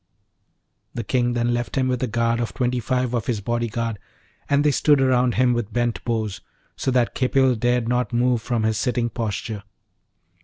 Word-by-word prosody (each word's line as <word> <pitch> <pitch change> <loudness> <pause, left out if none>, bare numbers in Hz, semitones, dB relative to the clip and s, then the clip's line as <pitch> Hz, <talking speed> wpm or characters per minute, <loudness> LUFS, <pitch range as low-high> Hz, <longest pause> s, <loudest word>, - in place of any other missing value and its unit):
The 120 - -3
King 120 +1 +1
then 120 0 +1
left 120 0 -3
him 130 -1 +1
with 125 -1 -1
a 130 - 0
guard 115 +1 0
of 120 - -3
twenty 125 -1 0
five 125 +1 -1
of 120 -3 -1
his 115 -4 0
body 120 +3 -1
guard; 115 -1 -3 0.5
and 140 0 +3
they 150 - +4
stood 145 0 +3
around 125 -2 +2
him 125 0 +3
with 120 -2 -2
bent 120 0 -1
bows, 110 -4 -2 0.3
so - - -2
that 125 -2 +2
Khipil 130 0 +2
dared 120 0 0
not 125 -2 0
move 120 0 +2
from 115 -1 -1
his 110 -1 +1
sitting 120 -1 0
posture. 110 -1 -3
120 Hz, 190 wpm, -23 LUFS, 115-125 Hz, 0.5 s, they